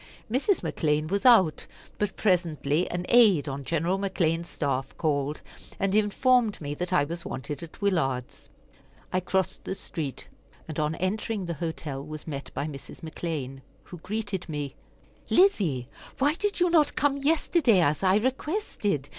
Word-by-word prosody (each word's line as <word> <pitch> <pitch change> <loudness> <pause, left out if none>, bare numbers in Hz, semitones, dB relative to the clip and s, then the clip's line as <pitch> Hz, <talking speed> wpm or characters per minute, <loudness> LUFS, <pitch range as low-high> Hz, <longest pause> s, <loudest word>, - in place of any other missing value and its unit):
Mrs. 290 - +2
McClean 155 0 0
was 200 +5 +2
out, 185 - +5 0.3
but 210 -2 -1
presently 170 -4 +1
an 175 0 -3
aide 210 -11 +5
on 140 0 -4
General 170 +6 0
McClean's 170 -4 0
staff 135 -3 -2
called, 145 -2 -1 0.4
and 195 0 +1
informed 215 +2 +3
me 145 -2 -4
that 180 +4 -4
I 180 -6 +4
was 170 +4 -5
wanted 145 +4 -5
at 165 -2 -10
Willard's. 135 -11 -1 0.6
I 185 - +3
crossed 190 +1 -1
the 190 - -3
street, 150 -8 -5 0.4
and 155 -1 -5
on 155 +1 0
entering 205 +2 -2
the 170 - -3
hotel 150 -4 -4
was 155 0 -8
met 140 -3 -5
by - - -1
Mrs. 140 -3 -9
McClean, 155 -5 -4 0.2
who 175 - -11
greeted 200 -1 -4
me: 145 -3 -4 0.5
"Lizzie, 185 - +3 0.3
why 285 +2 +3
did 410 +4 -2
you 355 -1 +3
not 310 -4 +4
come 285 -1 +2
yesterday, 290 - +3
as 150 -2 +2
I 190 0 +4
requested? 245 - -1
175 Hz, 155 wpm, -27 LUFS, 150-210 Hz, 0.6 s, out